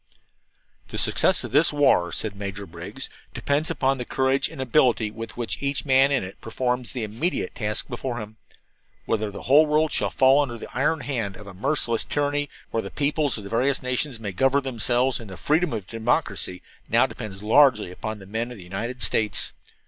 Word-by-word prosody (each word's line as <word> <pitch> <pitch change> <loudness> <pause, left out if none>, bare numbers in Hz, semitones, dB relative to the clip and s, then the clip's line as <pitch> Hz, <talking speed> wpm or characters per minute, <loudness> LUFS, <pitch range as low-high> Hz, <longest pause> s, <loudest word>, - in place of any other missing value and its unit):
"The - - -6
success - - +3
of - - -6
this 150 +4 +4
war," 135 - +3
said 105 +2 -3
Major 100 0 -5
Briggs, 85 0 -7 0.3
"depends 145 +3 0
upon 135 0 +1
the - - -2
courage 130 +2 +1
and 160 -3 -11
ability 125 -4 +2
with 115 +1 -8
which 120 -2 -3
each 140 +1 0
man 135 0 +5
in 135 -6 +2
it 95 +1 -9
performs 125 +2 -2
the 125 -4 -3
immediate 115 - -2
task 105 -2 -2
before 120 0 -4
him. 105 0 -9 0.7
Whether 110 -1 0
the 100 - -9
whole 150 +4 +6
world 155 +1 +2
shall - - 0
fall 135 +2 +5
under 120 -5 -3
the 115 - -10
iron 150 +4 +1
hand 115 -9 -2
of 105 - -11
a 100 - -10
merciless 115 +2 0
tyranny, 145 0 -1 0.2
or 115 - 0
the 100 - -7
peoples 145 0 0
of 105 - -8
the 100 - -8
various 130 +4 +1
nations 125 0 0
may 105 -3 -4
govern 135 +8 +2
themselves 125 0 +1
in 115 - -10
the 95 -2 -9
freedom 160 - +1
of 105 - -4
democracy, 110 - -1 0.3
now - - +5
depends 100 -2 -7
largely 115 -4 +4
upon 110 +4 -5
the 95 - -12
men 110 +4 -3
of 125 - -9
the 95 - -11
United 115 +7 -4
States. 105 -3 +1
120 Hz, 195 wpm, -24 LUFS, 105-140 Hz, 0.7 s, whole